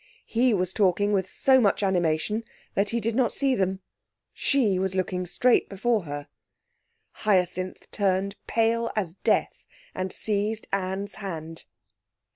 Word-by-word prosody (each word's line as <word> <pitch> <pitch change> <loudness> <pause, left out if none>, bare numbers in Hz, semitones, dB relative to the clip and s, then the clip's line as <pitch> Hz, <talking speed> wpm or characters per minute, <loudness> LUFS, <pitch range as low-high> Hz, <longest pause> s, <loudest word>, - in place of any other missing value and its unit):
He 245 +2 +2
was 185 -3 0
talking 205 +1 +2
with 190 -2 0
so 260 -1 +4
much 205 -1 +2
animation 185 +3 +1 0.3
that 200 +1 +1
he 235 - 0
did 230 +1 -1
not 250 -2 +2
see 275 -2 +2
them. 190 -4 0 0.5
She 225 -10 +2
was 190 0 -1
looking 185 -1 -1
straight 245 +8 +3
before 210 0 0
her. 145 -1 -6 0.9
Hyacinth 185 -3 0
turned 195 -1 0
pale 230 0 +1
as 190 -6 -1
death - - 0 0.3
and 185 0 -3
seized 210 +1 -2
Anne's 195 +1 -2
hand. 165 -4 -6
195 Hz, 135 wpm, -26 LUFS, 185-225 Hz, 0.9 s, so